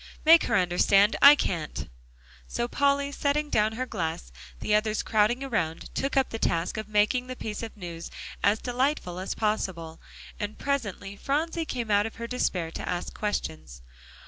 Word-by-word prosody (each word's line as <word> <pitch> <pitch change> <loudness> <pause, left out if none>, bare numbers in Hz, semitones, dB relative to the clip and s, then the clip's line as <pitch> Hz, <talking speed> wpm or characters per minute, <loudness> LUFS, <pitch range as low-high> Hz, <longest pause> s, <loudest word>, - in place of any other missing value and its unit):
"Make 330 +1 +7
her - - +1
understand; 195 +3 +4
I 285 +1 +10
can't." 165 - -3 0.6
So 240 - -2
Polly, 280 +2 +1
setting 290 +1 -1
down 215 +1 +2
her 255 +3 -3
glass, 160 - -4 0.3
the 210 - -1
others 215 0 +1
crowding 220 +4 +2
around, 180 -12 -2
took 275 +1 -1
up 265 - +2
the 225 - -4
task 170 +2 0
of 215 -1 -4
making 215 +4 +2
the 255 - -5
piece 215 -3 -5
of 225 -1 -7
news 170 -3 -7 0.3
as 205 +2 +4
delightful 245 - -1
as 190 - -4
possible, 185 -7 -2 0.4
and 210 0 -4
presently 205 -8 -3
Phronsie 320 +7 -1
came 240 -7 -3
out 205 +1 +3
of 225 - -10
her 235 - -6
despair, 185 -9 -1
to - - -6
ask 175 0 -3
questions. 155 - -4
215 Hz, 170 wpm, -27 LUFS, 185-255 Hz, 0.6 s, I